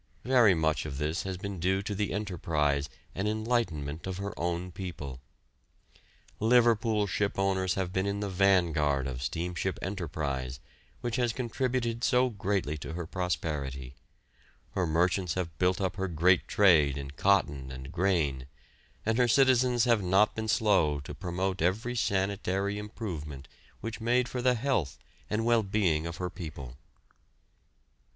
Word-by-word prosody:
Very 120 -6 +5
much 80 -2 0
of 70 -3 -5
this 75 +4 -1
has 95 -1 -3
been 100 -1 -5
due 95 +3 +1
to 105 0 -3
the 105 0 -1
enterprise 75 -8 -1 0.2
and 95 +2 -2
enlightenment 105 -9 -1
of 95 -1 -3
her 100 +1 -4
own 85 +1 -2
people. 85 -8 -6 1.2
Liverpool 115 -2 +3
shipowners 95 -2 0
have 95 -2 -2
been 95 +1 0
in 100 0 -1
the 105 - -2
vanguard 85 -8 +2
of 65 -2 -4
steamship 90 +5 -2
enterprise, 70 -9 -3 0.4
which 120 0 -2
has 120 -2 +2
contributed 120 -1 -2
so 125 0 +3
greatly 95 -7 -1
to 75 +2 -6
her 85 0 -4
prosperity; 75 -7 -3 0.8
her 90 -2 0
merchants 90 +2 +1
have 85 -4 -3
built 90 0 +2
up 95 -1 -2
her 95 0 -1
great 90 +2 +3
trade 80 -9 +4
in 70 -1 -6
cotton 70 -6 +1
and 65 +2 -8
grain, 80 -8 0 0.6
and 110 +2 +1
her 125 - +5
citizens 125 -1 +4
have 120 -3 +3
not 95 +3 +3
been 110 0 -4
slow 100 -9 +3
to 70 - -8
promote 95 +1 -2
every 110 +8 0
sanitary 100 -1 0
improvement 80 - -6 0.3
which 115 +1 -5
made 120 +2 +2
for 125 0 -4
the 125 0 +3
health 115 - -1 0.3
and 110 +1 0
well 120 -1 +4
being 95 -6 +1
of 85 - -6
her 90 -1 -3
people. 70 -8 -8
95 Hz, 145 wpm, -29 LUFS, 80-105 Hz, 1.2 s, Very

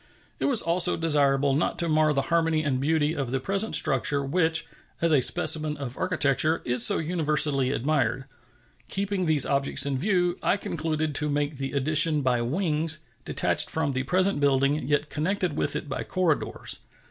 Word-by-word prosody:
It - - -2
was 260 -6 +4
also 175 +1 +3
desirable 140 -3 +2
not 150 - -1
to 170 - 0
mar 155 -1 +2
the 135 -2 -1
harmony 165 -2 +1
and 135 -4 -1
beauty 155 +1 0
of 135 -5 -4
the 135 +2 -2
present 195 +9 -1
structure, 140 +2 +1
which, 160 +2 0 0.3
as 165 -1 0
a 145 -4 +3
specimen 155 +4 +2
of 130 -3 -7
architecture, 155 +3 0
is 120 -1 +2
so - - +5
universally 150 -5 +1
admired. 135 -1 -1 0.6
Keeping 195 -2 -2
these 155 -4 +4
objects 140 0 +3
in 135 -2 -2
view, 180 0 0
I 200 - +1
concluded 155 -4 -3
to 150 +1 0
make 145 0 -2
the 135 0 -5
addition 150 +2 +2
by 125 -2 0
wings, 155 +3 -2 0.3
detached - - +1
from 160 -3 -2
the 130 -1 -2
present 185 +5 0
building, 140 0 +1
yet 145 +1 -1
connected 180 +1 -2
with - - -1
it - - -5
by 140 - -4
corridors. 180 -5 -1
150 Hz, 170 wpm, -25 LUFS, 140-165 Hz, 0.6 s, so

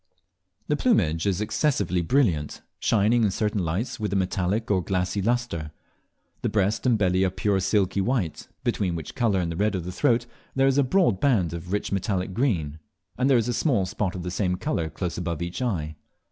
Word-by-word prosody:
The 150 - +2
plumage 90 - +2
is 100 0 0
excessively 105 - +1
brilliant, 85 - +1 0.2
shining 115 +2 +3
in 105 - +3
certain 105 0 -1
lights 110 +10 -2
with 105 -1 -2
a - - 0
metallic 95 +3 0
or 95 -2 +3
glassy 90 +2 -1
lustre. 115 -8 -1 0.7
The - - 0
breast 105 +4 +1
and 120 -3 +4
belly 95 -2 +2
are 95 - +3
pure 95 +2 0
silky 95 0 +1
white, 100 - -1 0.2
between 90 -4 0
which 80 -2 -6
colour 115 -7 +1
and 85 -2 -1
the - - -4
red 105 +1 +1
of 90 -3 -3
the 90 - -4
throat 115 +5 +2 0.3
there 135 0 +3
is 135 +1 +3
a - - +5
broad 130 - +2
band 100 - +2
of 85 +1 -6
rich 105 - -1
metallic 95 -1 -1
green, 85 - 0 0.4
and 130 +2 +1
there 135 - +6
is 115 0 +1
a 120 - 0
small 120 - +1
spot 95 0 -2
of 90 - -5
the 90 - -4
same 90 0 0
colour 85 -3 -2
close 90 +1 -4
above 85 -3 -3
each 85 +6 -4
eye. 80 -11 -2
95 Hz, 200 wpm, -25 LUFS, 90-115 Hz, 0.7 s, there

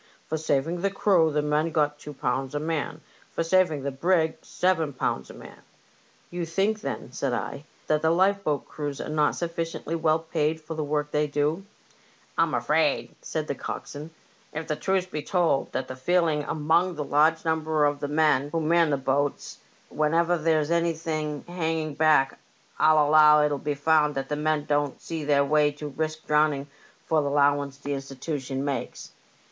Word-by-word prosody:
For 160 - -2
saving 160 +3 0
the 200 - +1
crew 190 -5 +3
the 150 0 0
men 150 +2 +1
got 150 -2 0
two 150 0 -9
pounds 135 +1 -2
a - - 0
man, 155 0 -3 0.3
for - - -2
saving 165 -4 +2
the 140 - -2
brig 160 +3 +1
seven 165 -5 0
pounds 65 - -2
a - - -10
man." - - -13 0.7
You 175 0 -3
think, 195 +6 0
then," - - -5
said 130 0 -2
I, 140 +4 -4
" - - -32
that 155 0 +1
the 160 - +2
lifeboat 185 -3 +1
crews 145 -2 -5
are - - -5
not 150 -1 +1
sufficiently 165 -1 -4
well 160 -1 +2
paid 160 -1 -1
for 160 +1 -7
the 155 -1 -3
work 150 0 -2
they 150 0 +1
do? 150 +6 -1 0.2
" - - -31
" - - -33
I'm - - +3
afraid," - - +1
answered - - -3
the - - -2
coxswain, 150 +2 -7 0.3
" - - -33
if 160 +1 -4
the 155 - -1
truth's 190 +3 0
to 185 - -24
be 150 - -3
told, 175 -5 +1
that's 130 - -3
the 130 - -6
feeling 160 +1 +1
among 165 +3 +1
a 150 - -2
large 155 +3 +2
number 160 -1 +1
of 145 0 0
the 145 - -3
men 145 -2 +2
who 165 - -1
man 165 +1 +3
the 140 - +1
boats. 140 +2 -1 0.3
Whenever 165 +3 +2
there's 160 -1 +1
any 170 0 +2
hanging 160 0 -3
back 150 -2 +3 0.4
I'll 155 -1 +5
allow 150 0 +7
it'll 145 -1 -1
be 145 +1 -2
found 150 0 +2
that 135 0 -3
the 150 - -1
men 150 0 0
don't 145 -2 0
see 165 -2 -5
their 140 -1 +3
way 150 +1 +3
to 150 0 -7
risk 155 +2 -4
drowning 150 -2 +2 0.4
for 160 -1 +2
the 140 - -1
'lowance 140 -1 +2
the 145 0 -6
Insti 135 -1 -5
tution 135 -1 -4
makes. 140 -1 -4
155 Hz, 190 wpm, -26 LUFS, 145-165 Hz, 0.7 s, allow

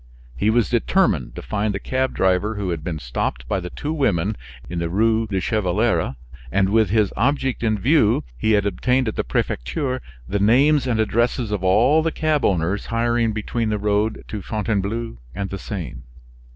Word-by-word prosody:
He 105 +12 +1
was 115 0 +3
determined 120 - +1
to - - -7
find 105 -1 -1
the - - -2
cab 130 +3 -1
driver 95 +4 +1
who 100 -3 -2
had 80 -3 -4
been 80 -2 -3
stopped - - -3
by 95 - 0
the 90 -1 -6
two 150 - -4
women 105 - +1 0.3
in 85 0 -4
the 85 0 -2
Rue 110 +4 +2
du 95 -2 -1
Chevaleret; 105 - 0 0.4
and 95 +1 +2
with 110 -1 +3
this 105 -1 +2
object 135 +2 0
in 110 -2 +1
view, 120 -1 +3
he 110 - +1
had 105 -1 +3
obtained 125 +6 +1
at 110 - -2
the - - 0
prefecture 125 - -2 0.3
the 100 - -1
names 135 +7 +4
and 115 -3 0
addresses 115 +1 +1
of 100 -3 -2
all 120 +12 +4
the 165 +1 0
cab 155 -3 0
owners 90 +2 0
hiring 115 0 +1
between 110 +1 -2
the 105 - 0
road 105 +1 0
to 105 - -4
Fontainebleau 105 - -2 0.2
and 100 -1 -3
the 95 - -4
Seine. 90 - -6
110 Hz, 185 wpm, -22 LUFS, 95-120 Hz, 0.4 s, names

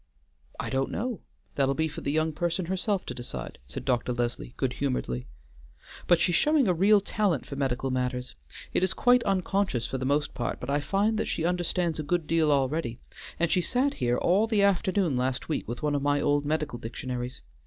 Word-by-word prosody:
"I - - -3
don't 135 0 0
know; 240 0 -3 0.3
that'll 135 -1 +1
be 160 +2 +1
for 150 - -7
the 140 - -1
young 155 +1 +1
person 170 +3 -1
herself 190 +2 -1
to - - -4
decide," 120 - -7
said 65 - -6
Dr. 125 -1 +1
Leslie 120 0 -3
good 130 -2 0
humoredly. 65 - -2 0.8
"But 175 - +5
she's 175 - +2
showing 295 - +3
a 180 - +4
real 200 +4 +5
talent 200 - 0
for 140 - -7
medical 135 -1 -1
matters. 125 0 -2 0.4
It - - +2
is 185 0 +1
quite 245 0 +5
unconscious 195 - 0
for 130 - -3
the 130 - -2
most 145 +2 +1
part, 130 - -3
but 125 - -4
I 145 - +2
find 200 +8 +1
that - - -1
she 165 - -1
understands 175 -2 0
a - - +1
good 165 +2 0
deal 160 -1 +2
already, 140 -2 0 0.4
and 170 -1 +2
she 180 - +3
sat 255 - +1
here 120 -1 0
all 195 +6 +3
the 215 -3 +2
afternoon 190 -5 +2
last 130 +3 -1
week 155 - -2
with 120 +5 -5
one 150 -1 +1
of 145 - 0
my 145 0 +2
old 145 0 +2
medical 150 -4 -1
dictionaries. 125 +2 -5
150 Hz, 205 wpm, -28 LUFS, 130-185 Hz, 0.8 s, But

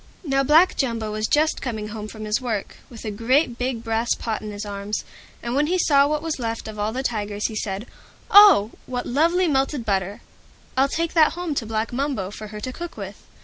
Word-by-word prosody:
Now 275 -4 +1
Black 310 +7 +5
Jumbo 230 -5 -1
was 215 0 -1
just 310 +1 +2
coming 220 -4 -4
home 215 -1 -6
from 215 0 -8
his 215 +4 0
work, 225 -5 -3
with 235 -2 -10
a 215 - -2
great 240 +5 +1
big 250 -2 -2
brass 225 +1 0
pot 220 -2 -3
in 215 - -6
his 205 0 -6
arms, 205 +1 -4 0.4
and 235 - -3
when 290 +3 +2
he 365 +3 +1
saw 285 -5 +4
what 300 +1 -1
was 325 -4 -3
left 230 -2 -3
of 215 -1 -8
all 210 +1 0
the 260 +3 -3
Tigers 210 -4 -2
he 220 - -7
said, 205 0 -3 0.5
"Oh! 400 - +8 0.2
what 245 -1 -3
lovely 340 +7 +2
melted 270 -3 0
butter! 195 -1 -1 0.5
I'll 270 +1 +3
take 330 +3 -1
that 315 -3 +5
home 350 -2 -3
to 235 -5 -3
Black 220 +1 -2
Mumbo 255 -8 -2
for 215 +1 -8
her 210 0 -8
to 255 +4 -4
cook 345 +3 -7
with." - - -8
235 Hz, 220 wpm, -23 LUFS, 215-285 Hz, 0.5 s, Oh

